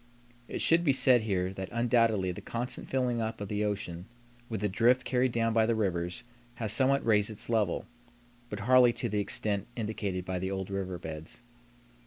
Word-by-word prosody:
It - - -4
should 165 +1 +4
be 140 -5 +3
said 130 -2 +5
here 95 -3 -1
that 95 -1 -6
undoubtedly 115 -5 +2
the 90 - -8
constant 120 +2 -4
filling 125 -3 0
up 110 0 -3
of 100 -1 -6
the 105 0 -1
ocean 95 -4 -4 0.4
with 110 -3 -4
the 105 - +1
drift 120 +6 +2
carried 125 0 +1
down 115 -1 0
by 110 -1 +3
the 115 - +1
rivers 90 -2 -2 0.3
has 110 -3 +1
somewhat 135 +3 +3
raised 105 -2 +3
its 110 +2 -4
level, 105 -6 0 0.6
but 105 -2 -5
hardly 125 +2 +5
to 120 - -3
the 105 0 -1
extent 100 0 -1
indicated 105 -5 -3
by 95 -1 -3
the 95 +1 -3
old 95 0 -4
river 95 -2 -3
beds. 80 +1 -8
110 Hz, 190 wpm, -29 LUFS, 95-120 Hz, 0.6 s, said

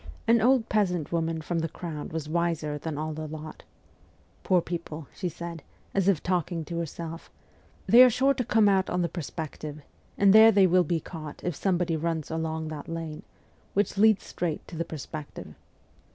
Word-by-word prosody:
An 230 0 +5
old 245 0 +4
peasant 180 -7 0
woman 165 -1 -1
from 165 +2 -2
the 165 0 -2
crowd 155 -2 -6
was 160 -2 -4
wiser 160 -2 -1
than 155 -1 -4
all 155 +1 -3
the 155 0 -5
lot. 155 0 -8 0.4
' - - -33
Poor 185 -2 +4
people/ 165 -3 -5
she 180 - -3
said, 170 0 -7 0.3
as 195 -1 +1
if 190 -7 +2
talking 175 -2 -1
to 170 +2 -4
herself, 165 0 -6 0.3
' - - -32
they 240 - +8
are 255 - +7
sure 265 +4 +3
to 255 - -2
come 220 -2 +3
out 190 -2 +3
on, 180 0 0
the - - +1
Perspective, 155 -2 -6 0.3
and 200 -1 +5
there 220 +1 +9
they 200 -2 +5
will 180 0 +4
be 170 -1 0
caught 155 -3 -9
if 175 -3 -2
somebody 175 -2 0
runs 160 -1 -2
along 160 -1 -2
that 155 -1 -7
lane, 165 -2 -5 0.5
which 205 +1 +1
leads 215 0 +4
straight 170 -3 -4
to 170 - -9
the 170 +1 -2
Perspective.' 155 -1 -8
170 Hz, 190 wpm, -27 LUFS, 155-190 Hz, 0.5 s, there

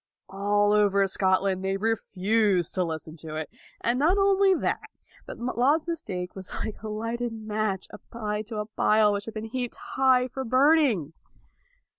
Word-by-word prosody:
All 205 +1 +2
over 200 -1 +4
Scotland, 190 0 +1
they 195 0 0
refused 205 -3 +1
to 185 - +1
listen 160 -1 -5
to 155 0 -8
it. 155 0 -5 0.3
And 240 +2 +1
not 335 +7 +3
only 390 -1 +4
that, - - -1 0.5
but - - -7
Laud's 255 +6 +1
mistake 180 - -4
was 190 -1 -8
like 215 - -7
a 220 - -6
lighted 230 +2 -3
match 215 -3 -2
applied 210 -2 -5
to 220 -2 -5
a 210 - -2
pile 215 0 +3
which 200 0 -3
had 225 - -8
been 215 0 -4
heaped 245 +1 -4
high 260 -1 +2
for 265 +1 -5
burning. 255 - +3
215 Hz, 160 wpm, -26 LUFS, 195-245 Hz, 0.5 s, over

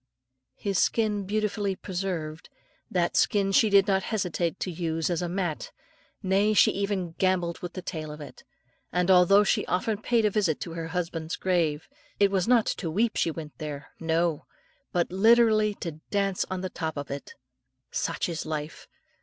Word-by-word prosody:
His 200 -2 -1
skin 210 -3 +1
beautifully 205 -1 -1
preserved 175 -5 -4
(by - - -41
), - - -39
that 170 - -1
skin 200 -1 +2
she 215 +2 +4
did 200 -1 +6
not 195 -1 +2
hesitate 180 -4 -2
to 185 - -2
use 165 0 -2
as 170 - -1
a 175 - -2
mat, 175 -4 -3 0.5
nay, 200 +3 +2
she - - +6
even 195 -3 -2
gambolled 180 -3 +1
with 180 -1 -6
the 185 - -6
tail 155 -3 -5
of 150 - -9
it; 145 - -11 0.5
and 180 +2 +2
although 185 +3 +6
she 205 - +1
often 205 +3 -1
paid 230 -2 +2
a 210 - +3
visit 195 -7 +1
to 170 - -5
her 165 -1 -4
husband's 165 -1 -3
grave, 165 -5 0 0.3
it 200 -1 +4
was 190 -1 +1
not 240 -3 +4
to 170 - -2
weep 220 +8 +1
she - - +1
went 155 -2 -7
there, 145 -2 -6
no! 165 -1 0 0.4
but 175 -1 0
literally 215 +1 +4
to 170 - -5 0.2
dance 195 -2 0
on 185 0 -3
the 185 - -3
top 160 -2 -4
of 145 -1 -5
it. 140 0 -7 0.6
Such - - -1
is 165 -3 -3
life! 155 -1 -5
180 Hz, 180 wpm, -27 LUFS, 165-200 Hz, 0.6 s, did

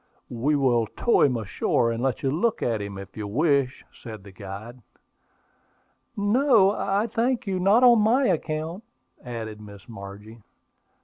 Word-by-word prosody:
"We 130 +6 0
will 120 -5 +2
tow 235 - +1
him 130 -4 +3
ashore 115 +2 0
and 115 0 -3
let 130 -1 -1
you 135 - +1
look 220 +10 0
at 115 -3 0
him, 100 -1 -6
if 100 0 -10
you 105 -2 -5
wish," 140 +2 0
said 110 -5 -10
the 100 - -12
guide. 100 +6 -9 1.4
"No, 210 -1 +4
I 200 +1 0
thank 235 +2 -1
you; 190 -2 -2
not 200 +7 +4
on 240 -2 +7
my 245 +6 +3
account," 165 +1 -2 0.4
added 110 -3 -7
Miss 100 -2 -13
Margie. 105 +1 -11
130 Hz, 150 wpm, -25 LUFS, -, 1.4 s, on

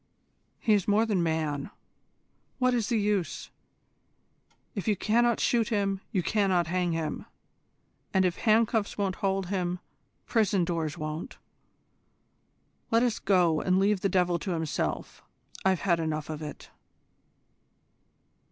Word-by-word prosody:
"He 220 - +2
is 200 -3 +1
more 210 +2 +3
than 205 -5 +1
man. 160 -3 -1 0.9
What 255 -1 +2
is 235 -4 0
the 235 - +2
use? 205 -4 -1 1.2
If 200 - -5
you 210 - +3
cannot 235 +4 +2
shoot 230 -3 +2
him, 200 -3 0
you 185 -4 0
cannot 190 -4 +2
hang 175 +1 0
him, 165 -1 -3 0.8
and 190 -1 +3
if 180 -1 0
handcuffs 220 -1 +2
won't 195 -2 -1
hold 195 -2 -1
him, 180 -2 -1 0.5
prison 200 -6 +2
doors 165 -4 -2
won't. 155 +2 -5 1.5
Let 230 +1 +3
us 240 -3 0
go 180 -5 +3
and 185 0 +2
leave 195 0 +2
the 195 - +1
devil 180 -2 +2
to 180 +4 -3
himself. 160 -2 -3 0.4
I've 190 -2 +2
had 175 -4 +2
enough 155 -1 -2
of 155 0 -6
it." 150 -1 -8
190 Hz, 135 wpm, -28 LUFS, 170-210 Hz, 1.5 s, more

